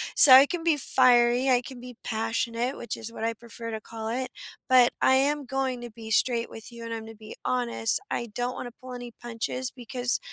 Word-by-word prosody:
so 270 Hz, -, +10 dB
I 265 Hz, +2 st, +10 dB
can 350 Hz, 0 st, -4 dB
be 330 Hz, -2 st, +3 dB
fiery, 250 Hz, -2 st, +3 dB
I 250 Hz, -1 st, +4 dB
can 255 Hz, 0 st, -10 dB
be 250 Hz, 0 st, -10 dB
passionate, 230 Hz, +3 st, -2 dB
which 235 Hz, -, -5 dB
is 225 Hz, +1 st, -7 dB
what -, -, -7 dB
I 230 Hz, 0 st, 0 dB
prefer 230 Hz, 0 st, -9 dB
to 220 Hz, -, -4 dB
call 220 Hz, 0 st, -8 dB
it, 250 Hz, +2 st, -3 dB, 0.4 s
but 250 Hz, -2 st, +6 dB
I 260 Hz, -, +5 dB
am 285 Hz, +2 st, +1 dB
going 260 Hz, -1 st, -2 dB
to 240 Hz, -1 st, -8 dB
be 220 Hz, 0 st, -10 dB
straight 235 Hz, +1 st, +1 dB
with 225 Hz, +2 st, -11 dB
you, 235 Hz, -1 st, -10 dB
and 230 Hz, 0 st, -5 dB
I'm 225 Hz, -, -4 dB
gonna 225 Hz, 0 st, -11 dB
be 215 Hz, 0 st, -11 dB
honest. 240 Hz, -, 0 dB
I 235 Hz, -, -2 dB
don't 245 Hz, +2 st, -2 dB
wanna 245 Hz, -, -6 dB
pull 255 Hz, 0 st, -9 dB
any 245 Hz, -1 st, -8 dB
punches, 240 Hz, +2 st, -3 dB
because 245 Hz, 0 st, -1 dB
245 Hz, 220 wpm, -26 LUFS, 230-255 Hz, 0.4 s, so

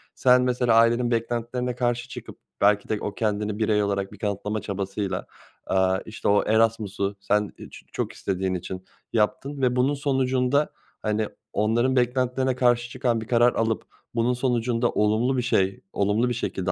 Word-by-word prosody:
sen 125 Hz, 0 st, +5 dB
mesela 125 Hz, -2 st, +2 dB
ailenin 120 Hz, +1 st, +4 dB
beklentilerine 120 Hz, +2 st, -1 dB
karşı 120 Hz, 0 st, -1 dB
çıkıp -, -, -9 dB, 0.2 s
belki 105 Hz, 0 st, +3 dB
de 110 Hz, -, +1 dB
o 105 Hz, -, -3 dB
kendini 105 Hz, -1 st, -1 dB
birey 105 Hz, -1 st, +2 dB
olarak 100 Hz, -1 st, -1 dB
bir 105 Hz, -, -12 dB
kanıtlama 105 Hz, 0 st, -2 dB
çabasıyla, 95 Hz, -1 st, -3 dB, 0.4 s
aaa, 95 Hz, 0 st, +2 dB
işte, 110 Hz, -, -5 dB
o 100 Hz, 0 st, +4 dB
Erasmus'u 105 Hz, -3 st, +1 dB
sen 105 Hz, +1 st, 0 dB
i -, -, -10 dB
ç -, -, -13 dB
çok -, -, -3 dB
istediğin 95 Hz, -1 st, -2 dB
için 95 Hz, +1 st, -5 dB, 0.3 s
yaptın 135 Hz, +6 st, 0 dB
ve 125 Hz, -1 st, +2 dB
bunun 130 Hz, +3 st, +2 dB
sonucunda, 135 Hz, 0 st, +1 dB, 0.3 s
hani, 110 Hz, 0 st, 0 dB, 0.3 s
onların 120 Hz, +5 st, +2 dB
beklentilerine 125 Hz, +1 st, +1 dB
karşı 120 Hz, -1 st, +2 dB
çıkan 120 Hz, -3 st, 0 dB
bir 110 Hz, -, -8 dB
karar 120 Hz, 0 st, +4 dB
alıp 115 Hz, -1 st, 0 dB, 0.3 s
bunun 120 Hz, +2 st, +2 dB
sonucunda 120 Hz, -1 st, 0 dB
olumlu 110 Hz, +5 st, +1 dB
bir -, -, +2 dB
şey, 95 Hz, -4 st, +1 dB
olumlu 105 Hz, +5 st, +1 dB
bir -, -, 0 dB
şekilde 95 Hz, -5 st, -2 dB
115 Hz, 160 wpm, -25 LUFS, 105-125 Hz, 0.4 s, sen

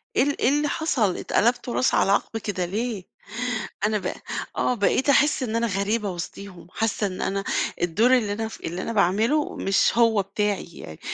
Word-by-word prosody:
إيه -, -, +4 dB
ال 285 Hz, 0 st, -1 dB
إيه 245 Hz, -, +4 dB
اللي 295 Hz, +1 st, +1 dB
حصَل 270 Hz, -, 0 dB
اتقلبتوا 240 Hz, +1 st, +1 dB
راس 255 Hz, -, +2 dB
على 195 Hz, -, +3 dB
عَقب 225 Hz, +2 st, 0 dB
كده 190 Hz, -4 st, -2 dB
ليه؟ 210 Hz, +1 st, -3 dB, 0.8 s
أنا 215 Hz, -1 st, +1 dB
بقى، -, -, -5 dB, 0.4 s
آه -, -, +2 dB
بقيت 250 Hz, +6 st, +1 dB
احس 290 Hz, -1 st, +4 dB
إن 225 Hz, -2 st, -2 dB
أنا 230 Hz, 0 st, +1 dB
غريبة 200 Hz, +1 st, -1 dB
وسطيهم، 180 Hz, +1 st, -8 dB
حاسّة 220 Hz, -2 st, -1 dB
إن 185 Hz, -1 st, -6 dB
أنا 195 Hz, 0 st, -1 dB, 0.4 s
الدور 210 Hz, +9 st, +3 dB
اللي 210 Hz, -4 st, -1 dB
أنا 220 Hz, +1 st, -3 dB
ف -, -, -10 dB
اللي 175 Hz, +3 st, -4 dB
أنا 230 Hz, -, -3 dB
باعمله 220 Hz, -, +2 dB
مش 195 Hz, +3 st, +2 dB
هو 225 Hz, -3 st, +4 dB
بتاعي، 205 Hz, +1 st, -1 dB
يعني 80 Hz, -1 st, -10 dB
215 Hz, 185 wpm, -24 LUFS, 195-240 Hz, 0.8 s, إيه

